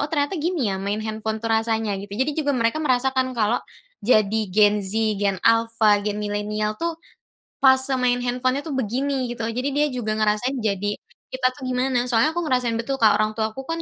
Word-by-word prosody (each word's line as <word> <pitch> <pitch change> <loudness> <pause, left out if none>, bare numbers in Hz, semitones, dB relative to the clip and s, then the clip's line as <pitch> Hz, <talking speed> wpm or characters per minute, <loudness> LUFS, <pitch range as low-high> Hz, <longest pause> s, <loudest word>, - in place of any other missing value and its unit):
"Oh 290 - -1
ternyata 290 +1 0
gini 300 - 0
ya 190 - -4
main 205 +2 -3
handphone 220 0 -4
tuh 225 - +1
rasanya," 225 -1 0
gitu. 200 0 -10
Jadi 265 +5 0
juga 285 -3 0
mereka 230 +5 0
merasakan 260 -2 0
kalau 220 +2 +1 0.4
jadi 215 -1 +3
Gen 210 +2 +3
Z, 200 +2 -3 0.2
Gen 200 -2 +1
Alpha, 225 -2 +3
Gen 205 0 -3
Milenial 210 +1 -2
tuh, 335 -1 -2 0.7
fase 265 0 +5
main 250 -1 +2
handphone-nya 255 +3 -1
tuh 310 - -4
begini, 260 +2 -1
gitu. 235 -2 -4
Jadi 250 +5 -2
dia 290 +2 +1
juga 215 -4 -2
ngerasain 215 +5 0
jadi 205 -2 -1 0.3
kita 260 0 0
tuh 275 - -10
gimana. 250 -1 0
Soalnya 245 +5 +3
aku 345 +2 -2
ngerasain 250 -3 +1
betul, 270 +4 -2
Kak, 220 - +6
orang 215 0 0
tua 220 -1 -1
ku 270 - -7
kan 330 0 -3
230 Hz, 195 wpm, -23 LUFS, 215-265 Hz, 0.7 s, Kak